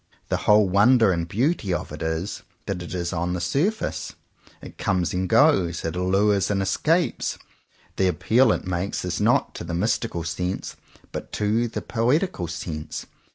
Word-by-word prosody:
The - - +1
whole 105 -1 +6
wonder 105 +3 +5
and 85 -2 -1
beauty 115 - 0
of 85 - -2
it - - -8
is 80 +4 -3 0.2
that 95 -2 -3
it 90 +1 -6
is 85 0 -2
on 90 +1 -1
the 90 - -2
surface. 145 - -1 0.5
It - - -12
comes 90 -3 0
and 90 0 -1
goes. 95 - +3
It 80 - -2
allures 95 +2 +2
and 100 -1 +1
escapes. 160 - 0 0.6
The 95 - +3
appeal 110 +8 +3
it - - -1
makes 90 +2 -2
is - - -2
not - - +2
to - - -7
the 85 0 -4
mystical 100 -2 -1
sense, 90 +3 -3 0.4
but - - -6
to 110 +3 +1
the 115 - -5
poetical 125 - 0
sense. 80 -1 -5
95 Hz, 165 wpm, -24 LUFS, 85-115 Hz, 0.6 s, whole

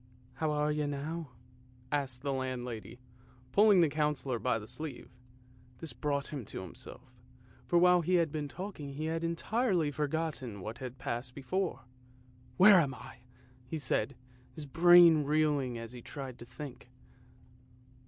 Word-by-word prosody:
" 125 +1 -28
How 155 - +2
are 150 0 +1
you 150 -1 -1
now? 150 +2 -4 0.3
" - - -27 0.3
asked 135 -3 -2
the 140 -1 0
landlady, 125 -3 -4 0.5
pulling 205 -3 +6
the 165 - +5
Councillor 150 -4 -1
by 125 -1 +1
the 105 -1 -8
sleeve. 155 +2 -7 0.7
This 160 +4 -6
brought 145 -1 -2
him 140 -4 -4
to - - -6
himself, 125 +8 -10 0.5
for 175 - +3
while 180 0 +6
he 180 +3 +1
had 165 -4 +2
been 150 -1 -3
talking 155 -4 -7
he 155 +3 -4
had 165 +1 -2
entirely 170 0 0
forgotten 145 -6 -3
what 110 +5 -6
had 130 0 -7
passed 125 -1 -4
before. 180 +7 -2 0.4
" 125 0 -27
Where 195 0 +9
am 140 -5 0
I? - - -11 0.3
" 125 0 -28
he 160 - -2
said, 135 -2 -1 0.4
his 155 -2 -7
brain 170 +1 +7
reeling 145 -4 +1
as 115 0 -7
he 125 -1 -9
tried 130 -1 -7
to 120 - -9
think. 125 0 -9
145 Hz, 165 wpm, -32 LUFS, 125-160 Hz, 0.7 s, Where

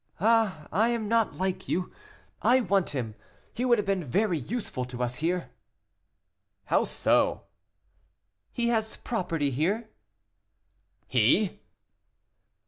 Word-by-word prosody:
"Ah, 215 -6 +2
I 215 +7 +3
am 230 -3 -1
not 230 0 +2
like 185 0 -2
you 180 +1 -1 0.5
I 255 +2 +5
want 195 -4 +1
him; 120 -6 -3 0.4
he 245 - -3
would 240 -2 +5
have 210 - -1
been 195 -2 0
very 180 - +1
useful 195 - -3
to 125 0 -4
us 125 +1 -2
here." 175 +2 -1 1.1
"How - - +2
so?" - - +2 1.1
"He 235 -1 0
has 220 -2 0
property 170 - -2
here." 200 - -1 1.1
"He!" - - +2
195 Hz, 120 wpm, -28 LUFS, 160-225 Hz, 1.1 s, I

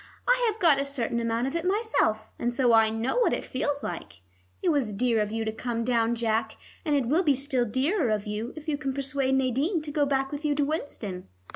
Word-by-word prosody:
I - - +4
have 430 - -11
got 310 -7 +5
a - - 0
certain 245 -4 -2
amount 230 +1 0
of 270 +4 -3
it 335 - -1
myself, 360 - 0
and 240 - 0
so 245 -1 +3
I 225 -1 +6
know 225 - -1
what 480 - +3
it - - -2
feels 285 +2 -2
like. 100 - -6 0.4
It 360 - +3
was 275 -9 +1
dear 230 0 +2
of 210 0 -2
you 225 0 -2
to 220 - -1
come 230 +1 -3
down, 235 -1 +1
Jack, 225 -1 -1 0.3
and 300 -4 +1
it 275 -3 +2
will 305 +9 +3
be 295 -6 +3
still 265 -2 0
dearer 265 - +1
of 210 -1 0
you 215 +3 -4
if 310 0 -10
you 290 -2 -1
can 270 -3 -3
persuade 275 -1 0
Nadine 265 - +1
to 300 - -6
go 290 -1 +1
back 270 0 0
with 290 +1 -5
you 295 -1 +1
to 290 0 +2
Winston." 225 - -4
265 Hz, 240 wpm, -27 LUFS, 225-295 Hz, 0.4 s, I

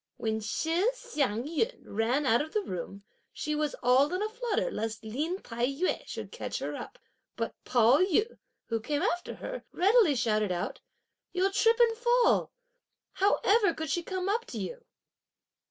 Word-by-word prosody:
When 220 -1 -1
Shih 325 - 0
Hsiang 250 - -1
yün 335 - -1
ran 235 +7 0
out 235 -1 +4
of 310 +1 -6
the 425 - +1
room, 190 - -6 0.3
she 305 - -3
was 300 -1 -1
all 260 +4 +4
in 365 +3 -1
a 430 - -1
flutter 475 +1 -1
lest 225 - -4
Lin 295 - -2
Tai 235 +1 -1
yü 280 +7 -1
should - - -6
catch - - -4
her - - -4
up; - - -8 0.4
but - - -3
Pao 245 +3 +5
yü, 400 +5 +1 0.3
who 230 -1 -1
came 290 +8 -2
after 355 -2 -1
her, - - -6
readily 390 - +4
shouted 215 -4 +1
out, 175 -1 -3 0.5
"You'll 375 +2 +2
trip 455 +3 +3
and 465 -1 +5
fall. 480 +1 +3 0.6
How 395 +2 +2
ever 405 -4 +4
could 315 -2 -3
she 345 - +1
come 370 +1 -3
up 455 +4 0
to - - -7
you?" 485 0 -5
320 Hz, 170 wpm, -29 LUFS, -, 0.6 s, Pao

